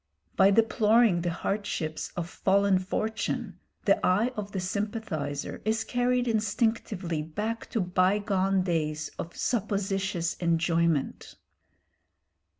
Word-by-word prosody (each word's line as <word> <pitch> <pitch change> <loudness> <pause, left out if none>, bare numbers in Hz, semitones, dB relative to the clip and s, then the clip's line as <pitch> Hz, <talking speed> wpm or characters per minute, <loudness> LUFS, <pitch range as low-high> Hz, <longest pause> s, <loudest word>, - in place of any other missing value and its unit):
By 190 0 +6
deploring 220 -2 +4
the 175 - -1
hardships 170 -3 -3
of 170 -1 -2
fallen 195 +1 +2
fortune 215 +3 -3 0.3
the - - +3
eye 215 +7 +3
of 205 -1 -5
the 195 - -3
sympathiser 185 -7 -3
is 220 +1 0
carried 245 +1 +1
instinctively 215 -6 0
back 210 +9 -4
to 225 - 0
bygone 190 +1 +2
days 155 -3 -1
of 170 - -6
supposititious 195 -5 -1
enjoyment. 165 -3 0
195 Hz, 105 wpm, -28 LUFS, 170-215 Hz, 0.3 s, By